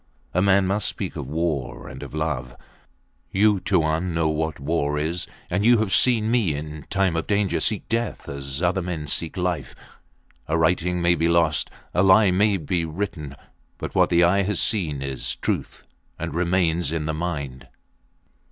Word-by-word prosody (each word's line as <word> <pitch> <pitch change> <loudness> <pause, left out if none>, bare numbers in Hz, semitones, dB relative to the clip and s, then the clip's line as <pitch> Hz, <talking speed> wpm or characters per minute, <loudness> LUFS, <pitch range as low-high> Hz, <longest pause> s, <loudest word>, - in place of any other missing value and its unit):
A 90 - +2
man 100 0 +4
must 100 +2 0
speak - - -4
of - - -5
war 80 -3 -2
and - - -9
of - - -8
love. 65 -6 -2 0.8
You, 105 0 +3
Tuan, 85 -1 0
know 80 -1 +2
what 80 0 -2
war 75 0 0
is, 80 +4 -2 0.2
and 95 +4 -1
you 120 +2 +6
have 105 -4 0
seen 110 +1 +3
me 105 -11 +2
in 75 0 -7
time 95 -3 +1
of 80 - -2
danger 100 -2 +1
seek 105 -2 -1
death 115 0 -2
as 70 +2 -5
other 95 +2 +2
men 85 -4 -4
seek 80 +5 -1
life! 90 -6 -2 0.7
A 80 - +1
writing 85 +2 +1
may 85 0 +5
be 85 0 +1
lost; 85 -3 +2 0.2
a 90 - +3
lie 95 +1 +6
may 100 +2 +3
be 85 +1 -1
written; 80 -4 -4 0.4
but - - -6
what - - +4
the 85 0 +4
eye 95 +3 +4
has 100 -1 -1
seen 85 -8 0
is 70 -1 -3
truth - - -3 0.3
and 80 -2 -4
remains 85 -2 +1
in 80 -2 -2
the 80 - -1
mind! 75 -6 -4
85 Hz, 175 wpm, -24 LUFS, 75-95 Hz, 0.8 s, you